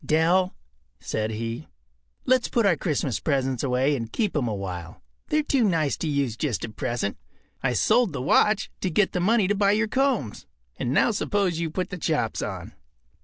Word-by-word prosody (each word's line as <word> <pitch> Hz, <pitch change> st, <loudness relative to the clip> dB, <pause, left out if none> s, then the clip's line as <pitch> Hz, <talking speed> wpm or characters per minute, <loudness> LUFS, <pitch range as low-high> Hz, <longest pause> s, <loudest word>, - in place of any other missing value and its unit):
“Dell,” 175 Hz, +4 st, +2 dB, 0.4 s
said 110 Hz, 0 st, -2 dB
he, 115 Hz, +5 st, -4 dB, 0.6 s
“let’s 255 Hz, -1 st, +3 dB
put 230 Hz, -3 st, +2 dB
our 190 Hz, -4 st, +4 dB
Christmas 145 Hz, -, -1 dB
presents 135 Hz, -4 st, 0 dB
away 130 Hz, +2 st, +1 dB
and 115 Hz, -4 st, -5 dB
keep 210 Hz, -6 st, -1 dB
’em 135 Hz, -5 st, +1 dB
a 110 Hz, -, -2 dB
while. 90 Hz, -3 st, -7 dB, 0.2 s
They’re 305 Hz, 0 st, +1 dB
too 275 Hz, -4 st, +2 dB
nice 165 Hz, -8 st, +1 dB
to 165 Hz, -, -3 dB
use 140 Hz, -6 st, 0 dB
just 115 Hz, -, -2 dB
at 110 Hz, -2 st, -11 dB
present. 120 Hz, -4 st, -2 dB, 0.4 s
I 125 Hz, -2 st, +1 dB
sold 220 Hz, -, +3 dB
the -, -, -4 dB
watch 200 Hz, +10 st, +2 dB
to 185 Hz, -, 0 dB
get 190 Hz, +4 st, +2 dB
the 180 Hz, -, -1 dB
money 205 Hz, +2 st, +3 dB
to 205 Hz, -, +2 dB
buy 200 Hz, 0 st, +3 dB
your 220 Hz, +1 st, +1 dB
combs. 225 Hz, -, -1 dB, 0.3 s
And 120 Hz, -, -2 dB
now 150 Hz, -, +3 dB
suppose 200 Hz, -5 st, 0 dB
you 165 Hz, -1 st, -1 dB
put 180 Hz, +3 st, -3 dB
the 180 Hz, -, -5 dB
chops -, -, -1 dB
on. -, -, -5 dB
160 Hz, 190 wpm, -25 LUFS, 125-205 Hz, 0.6 s, our